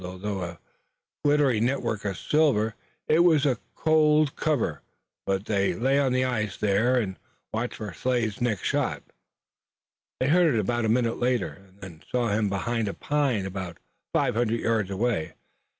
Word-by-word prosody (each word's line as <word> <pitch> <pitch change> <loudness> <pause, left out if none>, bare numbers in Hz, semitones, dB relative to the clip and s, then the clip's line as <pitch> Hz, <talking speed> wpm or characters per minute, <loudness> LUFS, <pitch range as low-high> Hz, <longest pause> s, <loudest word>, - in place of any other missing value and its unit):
Although 95 +2 -4
a 85 -1 -5 0.7
glittering 140 -6 +3
network 115 -5 -1
of 100 -3 -2
silver 135 -9 +2 0.3
it 155 - +4
was 160 -4 +5
a 130 -5 +1 0.2
cold 155 -2 +3
covert, 150 -7 -1 0.5
but 95 +1 0
they 100 -3 +1
lay 135 +4 +2
on 135 -2 +2
the 130 0 +2
ice 110 -6 -2
there 105 +5 +2
and 95 -6 -2 0.3
watched 115 +2 -2
for 105 -4 -6
Slade's 120 +2 -1
next 115 -6 0
shot. - - -1 1.2
They 130 - +1
heard 165 -4 +4
it 105 -4 0
a 120 -2 0
minute 115 0 +1
later, 120 -4 +1 0.2
and 95 +1 -24
then 85 -4 -11
saw 120 -2 +1
him 105 0 +1
behind 110 +3 -1
a 100 - -4
pine 140 -9 0
about 95 -2 -5 0.3
five - - +1
hundred 115 0 0
yards 110 -4 0
away. 100 -4 -1
115 Hz, 160 wpm, -26 LUFS, 100-130 Hz, 1.2 s, was